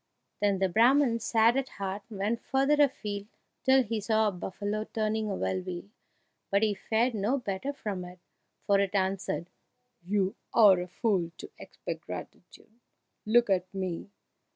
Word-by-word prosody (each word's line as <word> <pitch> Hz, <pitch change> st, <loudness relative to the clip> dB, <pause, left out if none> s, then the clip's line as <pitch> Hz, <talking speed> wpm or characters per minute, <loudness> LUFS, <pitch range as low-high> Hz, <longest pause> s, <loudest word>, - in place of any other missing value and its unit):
Then 200 Hz, -1 st, +2 dB
the 190 Hz, 0 st, +2 dB
Brahman, 235 Hz, +5 st, +4 dB
sad 230 Hz, +1 st, +3 dB
at 270 Hz, -1 st, -1 dB
heart, 195 Hz, 0 st, -3 dB
went 215 Hz, +2 st, -2 dB
further 275 Hz, +3 st, +2 dB
afield 210 Hz, -7 st, 0 dB, 0.4 s
till 265 Hz, 0 st, +5 dB
he 225 Hz, -1 st, -3 dB
saw 220 Hz, 0 st, +2 dB
a -, -, -4 dB
buffalo 205 Hz, +3 st, -3 dB
turning 220 Hz, -1 st, -1 dB
a 195 Hz, -, -1 dB
well 185 Hz, -, -1 dB
wheel; 185 Hz, +2 st, -7 dB, 0.6 s
but 200 Hz, +2 st, +2 dB
he 215 Hz, -1 st, +3 dB
fared 225 Hz, +5 st, 0 dB
no 215 Hz, +6 st, 0 dB
better 225 Hz, +2 st, -3 dB
from 210 Hz, -9 st, -5 dB
it, 180 Hz, +1 st, -11 dB, 0.5 s
for 200 Hz, -1 st, +4 dB
it 200 Hz, 0 st, 0 dB
answered, 190 Hz, -2 st, -1 dB, 0.5 s
"You 195 Hz, +1 st, 0 dB, 0.2 s
are 205 Hz, -6 st, +7 dB
a 180 Hz, -, -4 dB
fool 180 Hz, -2 st, 0 dB
to -, -, -9 dB
expect -, -, -7 dB
gratitude! 225 Hz, +2 st, -10 dB, 0.5 s
Look 235 Hz, -1 st, +4 dB
at 185 Hz, -1 st, +1 dB
me! 185 Hz, -1 st, -3 dB
210 Hz, 155 wpm, -29 LUFS, 190-230 Hz, 0.6 s, are